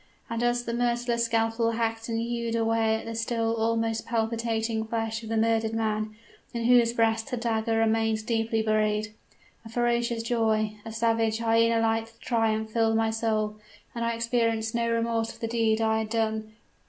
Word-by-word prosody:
And 230 0 -1
as 240 0 +1
the 235 - -3
merciless 240 0 0
scalpel 230 0 +1
hacked 225 0 -2
and 225 - -1
hewed 235 0 -2
away 225 -1 +2
at 220 - -5
the 230 - -5
still 225 0 -1
almost 225 0 0
palpitating 225 -1 -1
flesh 225 0 -2
of 220 - -8
the 225 - 0
murdered 225 0 +1
man, 215 -1 -1 0.4
in 235 - -1
whose 240 -1 +5
breast 225 -1 +1
the 250 - -2
dagger 225 -1 0
remained 225 -1 +1
deeply 225 -1 0
buried, 215 0 +1 0.5
a 225 - -10
ferocious 235 0 0
joy 220 -2 +1
a 225 - -7
savage, 225 -1 +1
hyena 230 0 +3
like 225 0 -1
triumph 220 -2 0
filled 225 -1 +2
my 225 0 +1
soul; 215 -1 -1 0.4
and 235 - -3
I 230 0 0
experienced 230 -1 0
no 235 0 0
remorse 230 0 0
for - - -16
the 230 - -2
deed 225 -1 +1
I 220 0 +2
had 220 -1 -3
done! 220 -1 -1
225 Hz, 175 wpm, -27 LUFS, 220-230 Hz, 0.5 s, whose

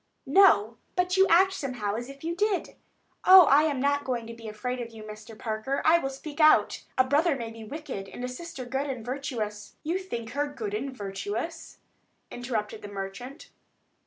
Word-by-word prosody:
"No; 265 - +5 0.2
but 360 0 +1
you 385 0 +5
act 380 +3 +5
somehow 250 - -3
as 240 +4 -4
if 275 +1 -12
you 335 +1 -2
did. 410 -1 0 0.5
Oh, 375 0 +10
I 290 +2 +5
am 290 -4 0
not 285 +1 +1
going 245 -3 -2
to 230 - -8
be 230 -1 -10
afraid 250 +4 -4
of 235 - -6
you, 225 -2 -11
Mr. 215 +1 -10
Parker. 220 +6 -2
I 335 +2 +6
will 270 - -2
speak 290 +3 -9
out. 310 0 +5
A 260 - +6
brother 290 +4 +2
may 230 -3 -5
be 225 0 -10
wicked 255 -6 -6
and 245 - -8
a - - -2
sister 260 0 -7
good 270 +3 -2
and 245 -4 -5
virtuous——" 240 -6 -4
"You 335 +4 -1
think 235 -12 -6
her 290 +2 -1
good 220 -8 -5
and 245 +6 -2
virtuous?" 215 - -5 0.5
interrupted 225 -4 -4
the - - -7
merchant. 205 +8 -7
255 Hz, 190 wpm, -27 LUFS, 225-305 Hz, 0.5 s, Oh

